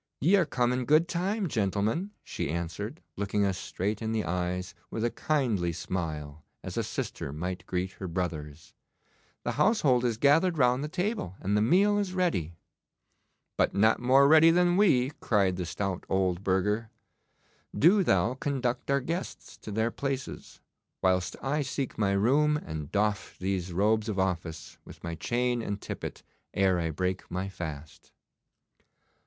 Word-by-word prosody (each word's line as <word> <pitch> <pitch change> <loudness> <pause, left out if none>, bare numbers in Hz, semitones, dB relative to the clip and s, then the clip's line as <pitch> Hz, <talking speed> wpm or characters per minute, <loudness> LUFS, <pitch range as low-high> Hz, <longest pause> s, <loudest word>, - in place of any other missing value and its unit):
'Ye 175 +8 +4
are 185 -5 +3
come 125 -3 +1
in 125 0 -1
good 155 +4 +4
time, 190 +4 -1
gentlemen,' 110 - 0
she - - -4
answered, 85 - -4
looking 100 0 0
us 95 -2 -1
straight 105 +4 -3
in 110 0 -2
the 110 -4 -1
eyes 90 +1 -2 0.2
with 115 +1 -2
a 120 - 0
kindly 115 - 0
smile 80 -4 -4 0.2
as - - -6
a - - +1
sister - - -4
might 90 +5 -4
greet 90 +1 -2
her 95 - -7
brothers. 80 -4 -4 0.7
'The - - -1
household 145 - +3
is 120 -3 0
gathered 160 +7 +4
round 125 0 +3
the - - -2
table 180 - -2
and 100 +2 0
the 105 - +3
meal 200 - +4
is 190 -2 -2
ready.' 90 - 0 1.0
'But - - +2
not 110 +3 +4
more 135 +3 +5
ready 160 +2 +7
than 175 +1 +4
we,' 140 -10 +4
cried 100 -4 +2
the 90 -2 -4
stout 95 0 -3
old 95 -1 +1
burgher. 105 +4 0 0.9
'Do 190 +6 +6
thou 100 - +2
conduct 130 -3 -2
our 140 0 +2
guests 170 +7 -5
to 110 - -9
their 110 +3 0
places, 135 0 -5 0.4
whilst 90 -1 +2
I 145 +3 0
seek 135 -2 -3
my 100 -2 +2
room 145 +9 +3
and 80 - -6
doff 105 0 -1
these 95 -1 -2
robes 105 +4 +2
of 105 - -2
office, 85 -4 -3
with - - -14
my 85 - -4
chain 120 +6 0
and 100 -2 -3
tippet, - - -6 0.3
ere 95 -2 +3
I 80 -1 -1
break 90 +4 -2
my 95 +2 -3
fast. 80 -5 -8
105 Hz, 160 wpm, -29 LUFS, 90-140 Hz, 1.0 s, ready